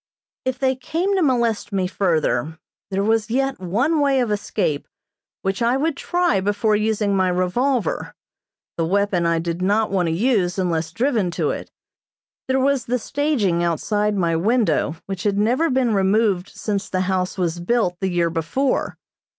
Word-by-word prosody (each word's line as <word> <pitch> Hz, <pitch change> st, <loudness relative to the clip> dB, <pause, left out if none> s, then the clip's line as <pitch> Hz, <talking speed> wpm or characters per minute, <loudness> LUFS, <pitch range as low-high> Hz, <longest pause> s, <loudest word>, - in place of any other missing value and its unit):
If 260 Hz, 0 st, -1 dB
they 265 Hz, 0 st, +1 dB
came 335 Hz, +10 st, -1 dB
to 380 Hz, -, +2 dB
molest 235 Hz, -9 st, +1 dB
me 190 Hz, -2 st, 0 dB
further 160 Hz, -6 st, 0 dB, 0.3 s
there 195 Hz, 0 st, -1 dB
was 220 Hz, 0 st, +1 dB
yet 270 Hz, +3 st, 0 dB
one 235 Hz, -, +1 dB
way 280 Hz, -2 st, +3 dB
of 240 Hz, -4 st, 0 dB
escape 200 Hz, -7 st, -1 dB, 0.6 s
which 195 Hz, +3 st, -1 dB
I 235 Hz, +3 st, +2 dB
would 305 Hz, +2 st, 0 dB
try 350 Hz, -, +1 dB
before 205 Hz, +2 st, +1 dB
using 210 Hz, -1 st, +1 dB
my 190 Hz, -1 st, +2 dB
revolver. 190 Hz, -, 0 dB, 0.6 s
The 165 Hz, -, +1 dB
weapon 195 Hz, -2 st, +1 dB
I 170 Hz, 0 st, +2 dB
did 170 Hz, +1 st, -3 dB
not 205 Hz, +3 st, +1 dB
want 185 Hz, -3 st, +1 dB
to -, -, 0 dB
use 190 Hz, -1 st, +1 dB
unless 165 Hz, -3 st, -1 dB
driven 230 Hz, -, 0 dB
to -, -, +1 dB
it. -, -, -6 dB, 0.8 s
There 265 Hz, 0 st, +2 dB
was 270 Hz, -2 st, +1 dB
the 250 Hz, +1 st, 0 dB
staging 240 Hz, -, 0 dB
outside 205 Hz, +5 st, 0 dB
my 170 Hz, -3 st, +1 dB
window 185 Hz, -, +1 dB
which 195 Hz, -2 st, -5 dB
had 200 Hz, -1 st, 0 dB
never 245 Hz, +10 st, +2 dB
been 255 Hz, -3 st, +1 dB
removed 195 Hz, -1 st, +2 dB
since 205 Hz, -2 st, -3 dB
the 185 Hz, -, 0 dB
house 185 Hz, 0 st, -1 dB
was 175 Hz, -2 st, -1 dB
built, 180 Hz, -1 st, 0 dB
the 190 Hz, -, -1 dB
year 170 Hz, -2 st, +1 dB
before. 170 Hz, -, -1 dB
205 Hz, 165 wpm, -21 LUFS, 180-250 Hz, 0.8 s, way